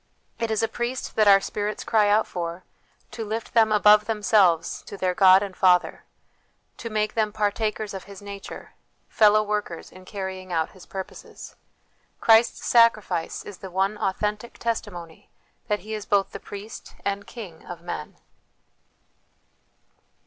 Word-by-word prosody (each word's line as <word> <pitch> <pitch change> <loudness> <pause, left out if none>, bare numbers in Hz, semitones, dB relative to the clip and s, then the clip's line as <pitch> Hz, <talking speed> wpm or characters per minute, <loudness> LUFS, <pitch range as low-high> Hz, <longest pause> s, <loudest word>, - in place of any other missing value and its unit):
It 230 -1 -1
is 220 0 0
a - - +3
Priest 240 +3 -4
that 215 -1 +4
our 195 -1 +8
spirits 210 +1 -4
cry 215 -2 +3
out 215 +2 +4
for, 170 0 -5 0.5
to 225 - -5
lift 220 +1 -5
them 225 -2 +4
above 210 0 +6
themselves 205 -6 +2
to 200 - -8
their 185 -1 0
God 190 +1 +6
and 195 -2 -6
Father, 180 -2 +2 0.7
to 230 - -6
make 215 -1 -1
them 215 -2 0
partakers 215 0 -1
of 190 - -7
His 200 -1 -11
nature, 200 -1 -9 0.4
fellow 215 0 +5
workers 210 -5 -4
in 185 0 -14
carrying 190 -2 -6
out 160 -2 0
His 185 - -16
purposes. 190 -1 -9 0.6
Christ's 225 +1 +4
Sacrifice 215 -8 +2
is 205 - -10
the 190 - -8
one 190 +3 0
authentic 210 +4 -2
testimony 180 -8 -5 0.4
that 210 -2 0
He 215 +1 -7
is 215 -1 -5
both 200 -2 +2
the - - -7
Priest 205 +2 -10
and 200 0 -2
King 190 -9 -10
of 175 -1 -8
men." 160 -3 -6
205 Hz, 150 wpm, -25 LUFS, 190-215 Hz, 0.7 s, our